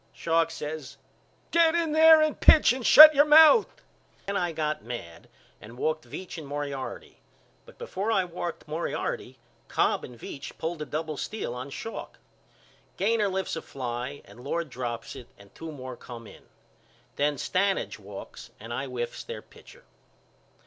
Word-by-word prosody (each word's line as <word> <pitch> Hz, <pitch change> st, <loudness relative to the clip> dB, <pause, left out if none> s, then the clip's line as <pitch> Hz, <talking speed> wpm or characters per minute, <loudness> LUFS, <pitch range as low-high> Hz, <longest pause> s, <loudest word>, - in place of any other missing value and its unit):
Schalk 165 Hz, 0 st, +1 dB
says 155 Hz, -3 st, -7 dB, 0.5 s
Get 335 Hz, -1 st, +4 dB
in 335 Hz, -2 st, 0 dB
there 315 Hz, 0 st, +7 dB
and 310 Hz, -1 st, -1 dB
pitch 310 Hz, -, +6 dB
and 255 Hz, -1 st, -6 dB
shut 310 Hz, +5 st, +10 dB
your 290 Hz, 0 st, +6 dB
mouth. 315 Hz, +9 st, +7 dB, 0.6 s
Then 200 Hz, -, -3 dB
I 175 Hz, -3 st, 0 dB
got 155 Hz, -5 st, -3 dB
mad 95 Hz, -9 st, -8 dB, 0.3 s
and 115 Hz, +3 st, -12 dB
walked 155 Hz, +3 st, -2 dB
Veach 185 Hz, -2 st, -7 dB
and 150 Hz, -, -10 dB
Moriarity 140 Hz, -2 st, -6 dB, 0.5 s
but -, -, -16 dB
before 225 Hz, -, -3 dB
I 195 Hz, -4 st, +2 dB
walked 175 Hz, -1 st, -6 dB
Moriarty 160 Hz, +3 st, -4 dB, 0.3 s
Cobb -, -, 0 dB
and 125 Hz, -, -10 dB
Veach 140 Hz, +4 st, -9 dB
pulled 160 Hz, 0 st, -4 dB
a 150 Hz, -, -5 dB
double 155 Hz, +2 st, -4 dB
steal 215 Hz, -, -4 dB
on 125 Hz, +2 st, -7 dB
Schalk. 225 Hz, +10 st, -8 dB, 0.8 s
Gainor 215 Hz, +1 st, +1 dB
lifts 190 Hz, -2 st, -3 dB
a 160 Hz, -, -5 dB
fly 125 Hz, +1 st, -6 dB
and -, -, -16 dB
Lord 160 Hz, +1 st, -3 dB
drops 120 Hz, -1 st, -5 dB
it 125 Hz, -3 st, -11 dB
and 100 Hz, -1 st, -18 dB
two 165 Hz, -1 st, -8 dB
more 130 Hz, -3 st, -8 dB
come 120 Hz, -1 st, -11 dB
in. -, -, -15 dB, 0.7 s
Then 145 Hz, +1 st, +1 dB
Stanage 180 Hz, -, -1 dB
walks 100 Hz, -1 st, -10 dB
and 115 Hz, +2 st, -8 dB
I 135 Hz, +3 st, -3 dB
whiffs 120 Hz, -2 st, -5 dB
their -, -, -8 dB
pitcher. -, -, -18 dB
155 Hz, 160 wpm, -27 LUFS, 125-200 Hz, 0.8 s, shut